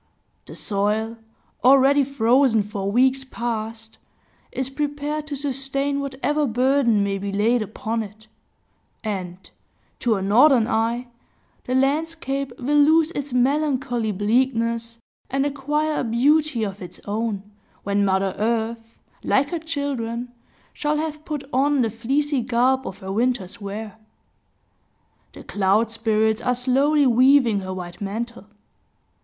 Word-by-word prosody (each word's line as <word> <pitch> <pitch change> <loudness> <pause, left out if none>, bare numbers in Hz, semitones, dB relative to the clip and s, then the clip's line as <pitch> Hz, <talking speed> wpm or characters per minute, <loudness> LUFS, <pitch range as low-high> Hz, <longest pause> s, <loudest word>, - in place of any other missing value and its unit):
The - - -10
soil, 215 +3 -1 0.4
already 275 +2 +6
frozen 250 -3 +3
for 200 -1 -4
weeks 260 +4 +3
past, 225 -3 -5 0.5
is 260 - -2
prepared 295 +2 -3
to 295 - -4
sustain 275 0 -1
whatever 280 +2 -1
burden 245 -2 +2
may 195 0 -1
be 200 +1 -4
laid 220 +4 +2
upon 220 +2 -3
it; 215 +1 -10 0.8
and, 185 -5 -4 0.6
to 235 -3 +2
a 195 - -3
northern 235 +3 +5
eye, 235 +1 -1 0.6
the 255 - -1
landscape 275 -1 0
will 290 +3 +1
lose 315 +2 +4
its 285 -4 -5
melancholy 250 -3 +1
bleakness 230 +2 0 0.3
and 275 +1 0
acquire 295 +2 -1
a - - 0
beauty 265 +2 +2
of 200 -1 -5
its 180 -1 -9
own, 210 -1 -2 0.4
when 200 0 +1
Mother 190 -1 +1
Earth, 230 +1 0 0.4
like 280 +1 +2
her 340 - -2
children, 265 -7 -3 0.4
shall 300 -1 -1
have 305 0 -4
put 295 -3 -4
on 275 +1 +3
the 225 - -1
fleecy 270 +5 0
garb 255 +2 +1
of 190 - -6
her 190 - -4
winter's 230 -2 -1
wear. 210 +2 -6 1.3
The - - -11
cloud 205 +3 +1
spirits 220 0 +1
are 250 +1 +1
slowly 275 +4 +2
weaving 255 -3 +4
her 185 -1 -6
white 180 -1 -7
mantle. 220 +1 -5
245 Hz, 130 wpm, -23 LUFS, 220-280 Hz, 1.3 s, already